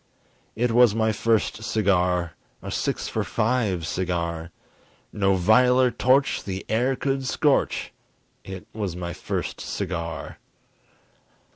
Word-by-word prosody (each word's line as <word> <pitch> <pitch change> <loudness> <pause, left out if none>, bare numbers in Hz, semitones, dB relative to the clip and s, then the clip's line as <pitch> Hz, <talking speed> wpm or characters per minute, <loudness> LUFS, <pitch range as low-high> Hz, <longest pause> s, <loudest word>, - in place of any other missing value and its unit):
It 120 +1 +1
was 120 -2 +5
my 110 -1 +2
first 110 0 0
cigar! 90 -6 +1 0.3
A - - -5
six - - -2
for - - -2
five 105 -7 0
cigar! 85 -1 -2 0.6
No 95 -2 +2
viler 125 +7 +4
torch 130 +3 +2
the 95 -1 -5
air 125 +4 +1
could 135 +1 -1
scorch - - +1 0.5
It 95 -1 -8
was 100 -5 -3
my 85 -1 -4
first - - -4
cigar! 85 -1 -4
105 Hz, 115 wpm, -24 LUFS, 90-120 Hz, 0.6 s, was